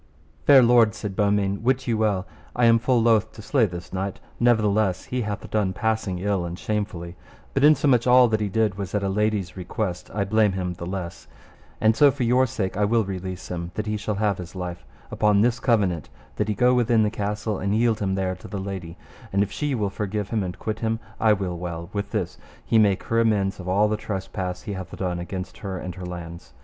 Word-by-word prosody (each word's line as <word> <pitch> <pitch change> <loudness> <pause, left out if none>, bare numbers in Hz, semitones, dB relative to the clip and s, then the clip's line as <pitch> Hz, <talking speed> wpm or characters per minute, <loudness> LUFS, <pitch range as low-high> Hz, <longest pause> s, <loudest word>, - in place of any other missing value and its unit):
Fair 135 -3 +8
lords, 120 -2 +5
said 100 -3 -5
Beaumains, 100 -1 +1
wit 130 +2 +1
you 115 - +1
well 105 -4 +1 0.3
I 120 - +3
am 115 0 +6
full 125 +1 +2
loath 110 -2 +3
to 110 - -10
slay 120 -2 +2
this 90 -1 -8
knight, 95 +1 -3 0.2
nevertheless 105 -5 +2
he 125 0 -2
hath 105 -2 -4
done 100 -3 +1
passing 110 -1 -1
ill 95 0 0
and 85 0 -5
shamefully; 95 -5 -3 0.4
but 135 - +1
insomuch 145 -5 +5
all 125 0 +7
that 110 -1 +1
he 105 -1 -1
did 105 -1 0
was 100 0 -4
at 100 - 0
a 100 - 0
lady's 105 -3 0
request 90 -1 -4
I 105 - -1
blame 105 0 +3
him 90 -1 -2
the 85 0 -7
less; 90 -2 -6 0.5
and 110 0 +4
so 145 +2 +6
for 135 -1 -2
your 125 +2 +3
sake 110 -7 -3
I 105 - +1
will 115 +2 +3
release 95 -1 -6
him 85 -1 -4
that 105 - -2
he 105 0 -1
shall 105 0 -2
have 100 -2 0
his 90 +1 -8
life 90 -1 -5 0.3
upon 105 -1 +3
this 120 +2 +2
covenant, 100 - +1 0.3
that - - 0
he 105 - -1
go 125 +3 +4
within 120 -2 +3
the 105 - +1
castle, 105 0 -2
and 100 +2 0
yield 115 -1 +2
him 95 -2 0
there 95 -1 -1
to - - -11
the 100 - -5
lady, 95 -3 -6 0.3
and 100 +1 +3
if 100 - -5
she 145 -2 -1
will 105 -4 -1
forgive 105 +1 -3
and 95 -5 -2
quit 110 0 -4
him, 115 0 -1 0.2
I 110 -1 +5
will 95 -4 -3
well; 85 -1 -6
with 100 0 -3
this 105 -6 -3 0.3
he 115 - +3
make 100 -3 +3
her 115 - 0
amends 105 -4 +1
of 90 0 -6
all 100 +3 +3
the 105 0 -1
trespass 95 -3 -4
he 105 - -4
hath 95 -1 -7
done 90 -2 -2
against 90 +1 -6
her 95 -4 -4
and 90 0 -5
her 90 0 -7
lands. 85 -2 -8
105 Hz, 225 wpm, -24 LUFS, 95-110 Hz, 0.5 s, Fair